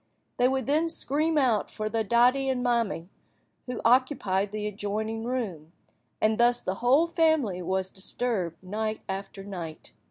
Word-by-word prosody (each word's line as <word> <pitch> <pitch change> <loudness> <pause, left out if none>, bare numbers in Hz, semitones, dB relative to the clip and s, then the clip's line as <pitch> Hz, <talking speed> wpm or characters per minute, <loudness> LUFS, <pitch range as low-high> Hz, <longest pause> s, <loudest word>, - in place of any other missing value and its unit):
They 245 - +4
would 265 0 0
then 310 +4 +2
scream 315 0 0
out 245 -7 +2
for 215 -1 -4
their 225 +1 0
"daddy" 250 +5 +3
and 255 -1 0
"mammy," 230 -7 0 0.6
who 250 -1 -4
occupied 230 -6 +2
the 210 0 -4
adjoining 215 +2 -3
room, 190 -11 -4 0.5
and 215 +1 +2
thus 240 0 +4
the 185 - -1
whole 265 +7 +5
family 315 - +1
was 190 +1 -1
disturbed 190 -4 -1
night 215 +3 -3
after 195 0 -5
night. 175 -5 -7
225 Hz, 150 wpm, -27 LUFS, 195-255 Hz, 0.6 s, whole